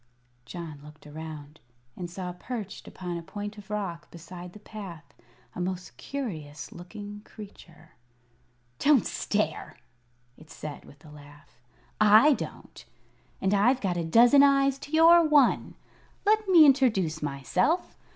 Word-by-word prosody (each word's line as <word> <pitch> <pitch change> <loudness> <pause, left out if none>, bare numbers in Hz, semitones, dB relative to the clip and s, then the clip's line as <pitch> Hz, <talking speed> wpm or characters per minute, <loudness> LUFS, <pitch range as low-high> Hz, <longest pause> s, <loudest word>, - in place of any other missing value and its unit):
John 155 0 -8
looked 150 0 -15
around, 150 0 -9 0.4
and 175 -1 -6
saw 180 0 -6
perched 205 +2 -7
upon 175 -2 -6
a - - -6
point 205 +4 -7
of 200 0 -15
rock 195 -5 -4
beside 175 +1 -11
the 210 - -12
path 175 -9 -10 0.4
a - - -5
most 185 0 -4
curious 155 - -6
looking 205 +3 -9
creature. 175 -8 -14 0.9
"Don't 290 -4 +4
stare!" 205 -7 -2 0.6
it 155 - -17
said, 150 -1 -8
with 145 +2 -18
a 150 - -13
laugh. 145 -3 -17 0.4
"I 215 +8 +7
don't, - - -8 0.6
and 190 +1 0
I've 240 +6 +3
got 190 -6 -1
a 170 - -2
dozen 235 - +6
eyes 275 -1 +3
to 290 - -11
your 335 +2 +7
one. 295 -5 +3 0.5
Let 430 0 +2
me 340 -5 +8
introduce 220 - +2
myself. 150 - -1
190 Hz, 135 wpm, -27 LUFS, 160-250 Hz, 0.9 s, me